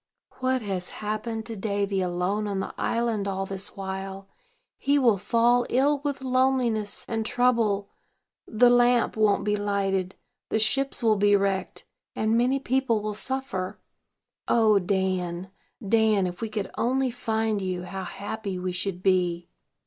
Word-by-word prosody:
"What 255 Hz, -1 st, 0 dB
has 190 Hz, -3 st, -3 dB, 0.2 s
happened 220 Hz, +1 st, -3 dB
to 225 Hz, -, -6 dB
Davy 200 Hz, -1 st, -1 dB
alone 180 Hz, +4 st, -1 dB
on 200 Hz, -1 st, -2 dB
the -, -, -4 dB
island 230 Hz, -4 st, -1 dB
all 195 Hz, 0 st, -2 dB
this 195 Hz, +1 st, -5 dB
while? 195 Hz, 0 st, -5 dB, 0.5 s
He 285 Hz, +1 st, +2 dB
will 235 Hz, -8 st, +3 dB
fall 235 Hz, +4 st, +3 dB
ill 280 Hz, +3 st, +2 dB
with 280 Hz, -1 st, -3 dB
loneliness 255 Hz, -5 st, +1 dB
and 225 Hz, -1 st, -1 dB
trouble; 220 Hz, -4 st, +1 dB, 0.6 s
the 240 Hz, +2 st, +4 dB
lamp 245 Hz, -1 st, +3 dB
won't 215 Hz, -2 st, +2 dB
be 210 Hz, 0 st, +1 dB
lighted, 195 Hz, -2 st, -1 dB, 0.3 s
the -, -, +1 dB
ships 270 Hz, +4 st, +1 dB
will 220 Hz, -2 st, +4 dB
be 205 Hz, 0 st, +4 dB
wrecked, 195 Hz, -1 st, -1 dB, 0.3 s
and 220 Hz, +1 st, +1 dB
many 250 Hz, +3 st, +3 dB
people 265 Hz, -4 st, +1 dB
will 215 Hz, 0 st, -2 dB
suffer. 255 Hz, -5 st, -3 dB, 0.7 s
O 215 Hz, -3 st, +4 dB
Dan, 185 Hz, -1 st, -1 dB, 0.4 s
Dan, 220 Hz, -2 st, +3 dB
if 180 Hz, +2 st, -5 dB
we 225 Hz, -, -2 dB
could 215 Hz, -2 st, -4 dB
only 260 Hz, +2 st, +1 dB
find 220 Hz, -3 st, -1 dB
you, 185 Hz, -1 st, -3 dB
how 190 Hz, +1 st, -6 dB
happy 200 Hz, +1 st, -5 dB
we 180 Hz, 0 st, -3 dB
should 180 Hz, 0 st, -3 dB
be!" 180 Hz, -2 st, +1 dB
210 Hz, 150 wpm, -26 LUFS, 195-235 Hz, 0.7 s, the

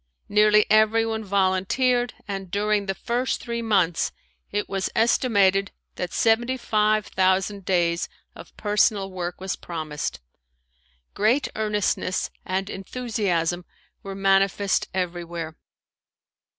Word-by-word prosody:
Nearly 210 Hz, 0 st, +5 dB
everyone 220 Hz, +1 st, +3 dB
volunteered 200 Hz, +6 st, +1 dB
and 195 Hz, -2 st, -5 dB
during 205 Hz, +1 st, 0 dB
the 195 Hz, -, -1 dB
first 245 Hz, +5 st, -1 dB
three 235 Hz, -1 st, -4 dB
months 190 Hz, -7 st, +1 dB, 0.4 s
it 205 Hz, 0 st, -2 dB
was 195 Hz, -1 st, -2 dB
estimated 200 Hz, -5 st, +3 dB, 0.2 s
that 180 Hz, -1 st, -4 dB
seventy 240 Hz, +3 st, +2 dB
five 215 Hz, -3 st, +1 dB
thousand 190 Hz, +1 st, +1 dB
days 170 Hz, -2 st, +1 dB, 0.2 s
of -, -, -14 dB
personal 205 Hz, -2 st, +1 dB
work 180 Hz, -1 st, -5 dB
was 190 Hz, 0 st, -3 dB
promised. 155 Hz, -3 st, -5 dB, 0.9 s
Great 235 Hz, +7 st, +2 dB
earnestness 210 Hz, -3 st, -1 dB
and 190 Hz, +1 st, -2 dB
enthusiasm 195 Hz, -5 st, -2 dB, 0.4 s
were 195 Hz, -1 st, -7 dB
manifest 195 Hz, 0 st, +2 dB
everywhere. 170 Hz, -3 st, -4 dB
200 Hz, 105 wpm, -24 LUFS, 185-215 Hz, 0.9 s, Nearly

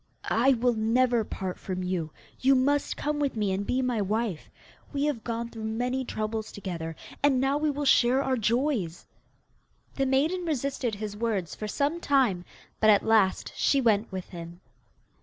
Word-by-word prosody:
'I 255 Hz, +5 st, +4 dB
will 245 Hz, 0 st, +2 dB
never 235 Hz, +2 st, +2 dB
part 190 Hz, -3 st, -5 dB
from 185 Hz, -1 st, -4 dB
you. 180 Hz, -3 st, -2 dB, 0.3 s
You 270 Hz, +1 st, +4 dB
must 280 Hz, +3 st, +1 dB
come 295 Hz, 0 st, -1 dB
with 280 Hz, -4 st, 0 dB
me 210 Hz, -3 st, 0 dB
and 195 Hz, +2 st, -2 dB
be 260 Hz, +1 st, +1 dB
my 245 Hz, -4 st, 0 dB
wife. 205 Hz, -3 st, -2 dB, 0.4 s
We 285 Hz, 0 st, 0 dB
have 275 Hz, -7 st, -1 dB
gone 235 Hz, 0 st, -3 dB
through 220 Hz, -1 st, -6 dB
many 245 Hz, +4 st, -1 dB
troubles 215 Hz, -1 st, -3 dB
together, 170 Hz, -5 st, -5 dB, 0.3 s
and 280 Hz, -3 st, +4 dB
now 270 Hz, +2 st, +1 dB
we 305 Hz, 0 st, +1 dB
will 290 Hz, 0 st, -2 dB
share 260 Hz, 0 st, +4 dB
our 265 Hz, -1 st, +1 dB
joys. 230 Hz, -, 0 dB, 0.9 s
The 270 Hz, -1 st, 0 dB
maiden 305 Hz, +8 st, +1 dB
resisted 275 Hz, -7 st, -1 dB
his 205 Hz, 0 st, -5 dB
words 205 Hz, -7 st, -2 dB
for 215 Hz, -, -5 dB
some 285 Hz, +10 st, 0 dB
time, 255 Hz, -, +2 dB, 0.3 s
but 215 Hz, -, +4 dB
at 205 Hz, -2 st, +5 dB
last 220 Hz, -4 st, +2 dB
she 275 Hz, -, +2 dB
went 220 Hz, -4 st, +2 dB
with 185 Hz, -1 st, -6 dB
him. 170 Hz, 0 st, -9 dB
230 Hz, 175 wpm, -27 LUFS, 205-270 Hz, 0.9 s, at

